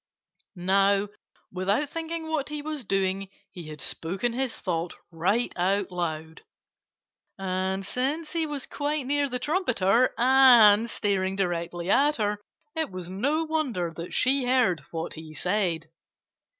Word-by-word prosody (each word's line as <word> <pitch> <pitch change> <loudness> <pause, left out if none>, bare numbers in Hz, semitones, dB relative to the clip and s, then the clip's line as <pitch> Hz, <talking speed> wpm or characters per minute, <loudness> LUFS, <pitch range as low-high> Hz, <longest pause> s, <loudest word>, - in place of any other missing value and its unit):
Now, 195 +2 +2 0.4
without 200 +10 0
thinking 330 0 -4
what 310 -3 -2
he 300 -1 -5
was 300 -5 -4
doing 195 0 0 0.2
he 175 -5 -9
had 155 -1 -9
spoken 190 - -2
his 260 -1 -1
thought 170 -2 -3 0.2
right 195 +9 0
out 190 +2 0
loud. 160 -2 -4 1.0
And 190 0 -2
since 275 - -1
he 325 -2 0
was 290 -3 -4
quite 290 -1 -2
near 285 +1 +1
the 250 - -1
trumpeter 255 - +2
and 240 -4 +7
staring 195 -3 -1
directly 175 -1 -2
at 295 +2 +4
her, 210 -1 -1 0.4
it 320 0 -1
was 185 -1 -7
no 285 +12 0
wonder 270 - -1
that 170 +1 -7
she 265 0 +3
heard 245 - +2
what 165 0 -4
he 155 -1 -10
said. 180 -4 -1
200 Hz, 135 wpm, -26 LUFS, 180-270 Hz, 1.0 s, and